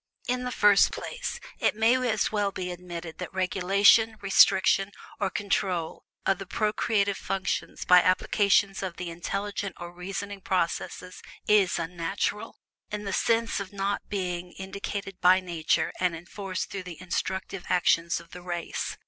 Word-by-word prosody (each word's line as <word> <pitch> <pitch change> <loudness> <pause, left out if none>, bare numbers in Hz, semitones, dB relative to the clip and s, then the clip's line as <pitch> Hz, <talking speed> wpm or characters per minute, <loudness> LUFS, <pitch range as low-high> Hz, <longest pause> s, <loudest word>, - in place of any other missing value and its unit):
In 250 0 -1
the 250 - -2
first 205 -4 +5
place, - - -5 0.2
it - - +2
may 225 +2 +4 0.2
as 220 -1 +1
well 205 -2 0
be 180 -1 -4
admitted 175 -2 -8
that 180 - -5
regulation, 200 +4 +4
restriction, 195 0 +4 0.3
or 195 - +1
control 185 -4 -2 0.2
of 195 -1 +2
the 195 - -7
procreative 210 -1 0
functions 195 -1 -3
by 180 0 +7
application 200 +2 +3
of 185 -3 -4
the 180 -1 -5
intellect 195 +4 -3 0.2
or 175 0 -7
reasoning 195 +3 -6
processes 180 0 -2 0.3
IS 205 -4 +4
unnatural, 180 +6 -3 0.3
in 210 0 -4
the 200 -1 -3
sense 230 +2 +1
of 195 -1 -6
not 200 0 -1
being 180 -3 -3
indicated 195 0 -6
by 185 +1 +6
Nature 170 -4 0
and 180 -2 +1
enforced 185 +3 -5
through 195 - -4
the 180 -3 -9
instinctive 190 +1 -3
actions 170 -1 +2
of 170 - -16
the 180 - -9
race. 175 -1 -4
190 Hz, 150 wpm, -27 LUFS, 180-200 Hz, 0.3 s, by